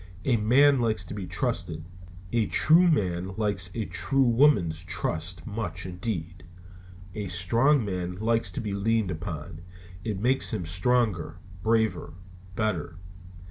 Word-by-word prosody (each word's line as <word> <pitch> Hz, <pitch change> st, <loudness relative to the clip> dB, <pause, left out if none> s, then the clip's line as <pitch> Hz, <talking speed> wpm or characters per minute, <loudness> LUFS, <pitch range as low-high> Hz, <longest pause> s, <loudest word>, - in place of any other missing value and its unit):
A 130 Hz, -, +3 dB
man 130 Hz, +6 st, +4 dB
likes 110 Hz, -6 st, 0 dB
to -, -, -7 dB
be 100 Hz, -3 st, -5 dB
trusted. 85 Hz, -2 st, -2 dB, 0.5 s
A 115 Hz, -3 st, +2 dB
true 170 Hz, +3 st, +5 dB
man 95 Hz, -, 0 dB
likes 100 Hz, -5 st, 0 dB
a 115 Hz, -2 st, -2 dB
true 95 Hz, +10 st, +1 dB
woman's 115 Hz, -, +3 dB
trust, 90 Hz, -2 st, -3 dB
much 90 Hz, -5 st, -3 dB
indeed. 90 Hz, -2 st, -5 dB, 0.7 s
A 105 Hz, -2 st, -4 dB
strong 115 Hz, -, +2 dB
man 90 Hz, -2 st, -3 dB
likes 110 Hz, -1 st, 0 dB
to -, -, -3 dB
be 105 Hz, -3 st, -3 dB
leaned 105 Hz, 0 st, 0 dB
upon. 80 Hz, -1 st, -6 dB, 0.4 s
It 105 Hz, -4 st, -3 dB
makes 130 Hz, +5 st, +2 dB
him 90 Hz, -5 st, -4 dB
stronger, 90 Hz, 0 st, 0 dB, 0.3 s
braver, 110 Hz, -4 st, 0 dB, 0.4 s
better. 85 Hz, -6 st, -2 dB
100 Hz, 135 wpm, -27 LUFS, 90-115 Hz, 0.7 s, true